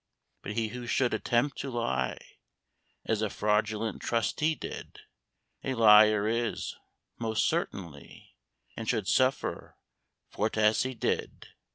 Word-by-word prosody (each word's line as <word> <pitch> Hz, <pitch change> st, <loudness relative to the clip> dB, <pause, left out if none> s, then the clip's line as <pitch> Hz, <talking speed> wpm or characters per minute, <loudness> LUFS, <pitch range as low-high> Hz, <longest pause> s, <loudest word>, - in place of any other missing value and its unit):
But 105 Hz, -, -5 dB
he 110 Hz, 0 st, -1 dB
who 120 Hz, +1 st, -7 dB
should 125 Hz, 0 st, +1 dB
attempt 120 Hz, +5 st, 0 dB
to 140 Hz, -, -4 dB
lie 65 Hz, -, -1 dB, 0.9 s
As 110 Hz, -1 st, 0 dB
a 110 Hz, -, 0 dB
Fraudulent 105 Hz, +2 st, 0 dB
Trustee 150 Hz, +7 st, 0 dB
did, -, -, -8 dB, 0.6 s
A 130 Hz, -, -2 dB
liar 105 Hz, -2 st, +6 dB
is, 115 Hz, 0 st, -2 dB, 0.4 s
most 110 Hz, -2 st, 0 dB
certainly, 85 Hz, -6 st, -4 dB, 0.4 s
And -, -, -4 dB
should -, -, 0 dB
suffer 130 Hz, +1 st, 0 dB, 0.5 s
for't 110 Hz, +1 st, -1 dB
as 110 Hz, 0 st, +4 dB
he 130 Hz, 0 st, -2 dB
did. -, -, -3 dB
110 Hz, 125 wpm, -29 LUFS, 105-120 Hz, 0.9 s, liar